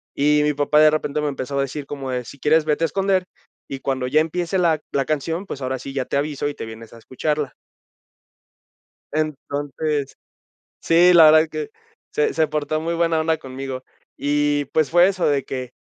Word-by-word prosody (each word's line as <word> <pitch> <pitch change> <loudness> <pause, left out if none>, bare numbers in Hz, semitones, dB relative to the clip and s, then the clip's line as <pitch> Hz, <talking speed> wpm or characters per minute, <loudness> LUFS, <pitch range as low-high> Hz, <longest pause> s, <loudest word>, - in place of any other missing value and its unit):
y 150 +1 +3
mi 150 0 +2
papá 145 +1 +2
de 155 0 +7
repente 150 -1 -1
me 150 - -1
empezó 140 0 -4
a - - +3
decir 140 +1 -4
como 140 -2 -6
de: 125 -1 -2
"Si 140 - -12
quieres 155 +1 +3
vete 155 +2 +1
a - - +1
esconder, 190 +2 0 0.4
y 135 - -6
cuando 130 -1 -2
ya 155 +4 +3
empiece 170 +3 -2
la 165 -4 +2
la 140 - +1
canción, 160 +6 -2
pues, 140 - -7
ahora 130 0 -2
sí 135 - -8
ya 135 -2 -2
te - - -4
aviso, 145 0 -2
y 145 - -4
te - - -6
vienes 110 0 -11
a - - -12
escucharla". 145 +4 -2 1.6
Entonces 145 -1 -2 0.7
sí, 175 +2 +5
la 165 -3 +8
verdad 155 +1 +5
que 445 -1 -5 0.4
se 445 +1 0
se 155 - +2
portó 155 +1 -2
muy 165 +1 -2
buena 165 -1 +1
onda 160 0 +1
conmigo, 130 0 -7 0.3
y, 145 0 +1
pues, 155 -2 +2
fue 175 +1 +6
eso 185 -2 0
de 140 -2 +1
que, 130 -2 -5
150 Hz, 195 wpm, -21 LUFS, 135-160 Hz, 1.6 s, la